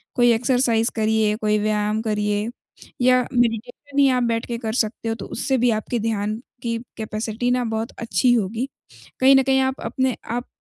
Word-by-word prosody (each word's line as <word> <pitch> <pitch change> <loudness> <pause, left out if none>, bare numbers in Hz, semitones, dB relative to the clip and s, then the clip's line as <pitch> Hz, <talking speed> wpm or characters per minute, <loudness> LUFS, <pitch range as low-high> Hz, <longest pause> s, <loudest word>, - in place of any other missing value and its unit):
कोई 240 -1 +5
एक्सरसाइज़ 235 -1 +2
करिए, 220 -1 +2
कोई 215 -1 +1
व्यायाम 210 0 0
करिए। 210 0 -1 0.5
या 255 0 +5
मेडिटेशन 245 +4 -1
ही 275 - +6
आप 250 -1 +2
बैठ 230 -1 0
के 235 - -3
कर 220 -2 -3
सकते 225 -1 -1
हो, 225 - -1
तो 210 - -8
उससे 265 +3 -1
भी 245 0 +3
आपके 230 +2 -3
ध्यान 215 -1 -1 0.3
की 230 -1 -1 0.2
कैपेसिटी 220 +2 -2
ना 250 0 +1
बहुत 225 +2 -3
अच्छी 245 +2 +2
होगी, 225 +3 0 0.5
कहीं 265 +1 +7
न 270 - +5
कहीं 265 0 +3
आप 265 0 -1
अपने 255 +2 -1 0.2
आप 245 - -5
230 Hz, 180 wpm, -22 LUFS, 215-250 Hz, 0.5 s, कहीं